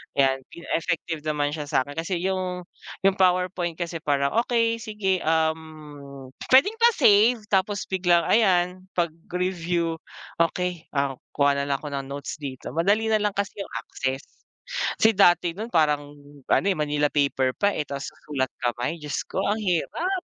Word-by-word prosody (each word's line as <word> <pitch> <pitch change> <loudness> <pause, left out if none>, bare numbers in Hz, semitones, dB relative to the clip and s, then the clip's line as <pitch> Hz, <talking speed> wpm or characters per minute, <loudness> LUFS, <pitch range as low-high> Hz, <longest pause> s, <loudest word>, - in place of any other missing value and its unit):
'yan. 135 -1 +3 0.2
E - - -10 0.2
effective 165 0 -2
naman 145 -1 0
siya 150 -1 -5
sa'kin 145 +1 -1
kasi 170 +3 -2
yung 185 -1 -2 0.4
yung 195 - +6
PowerPoint 180 -2 +1
kasi 170 -1 -4
parang, 140 -2 +1
"Okey, 230 -1 +1
sige, 210 -4 -1
um, 155 -4 -3 0.2
pwedeng 405 +13 +5
pa-save? 240 - +5
Tapos 200 +1 +1
biglang 175 -2 +2
ayan, 185 -3 +2
'pag 170 -2 +1 0.2
review, 175 -2 -1 0.4
"Okey, 175 0 0
ah, 140 -2 0 0.2
kuha 140 -1 +3
na 140 - -2
lang 140 - +1
ako 150 - -5
ng 135 -1 -4
notes 140 +2 -6
dito." 135 -3 -6
Madali 205 - +2
nalang 210 -2 +1
kasi 200 +1 -3
yung 195 - -6
access. 135 +1 -3 0.8
Kasi 220 - +6
dati 175 -2 +4
nun 225 +3 -6
parang 150 -3 +2 0.4
ano, - - +3
eh, 195 - +2
Manila 150 -1 +1
paper 140 -3 +1
pa, 205 0 +2
eh, 150 - -3
tapos 140 -1 -5
sa - - -25
sulat 130 -3 -1
kamay, 120 +7 -2
Diyos 150 -1 -3
ko, - - -3
ang 205 - +1
hirap! 270 - -1
170 Hz, 160 wpm, -25 LUFS, 145-195 Hz, 0.8 s, yung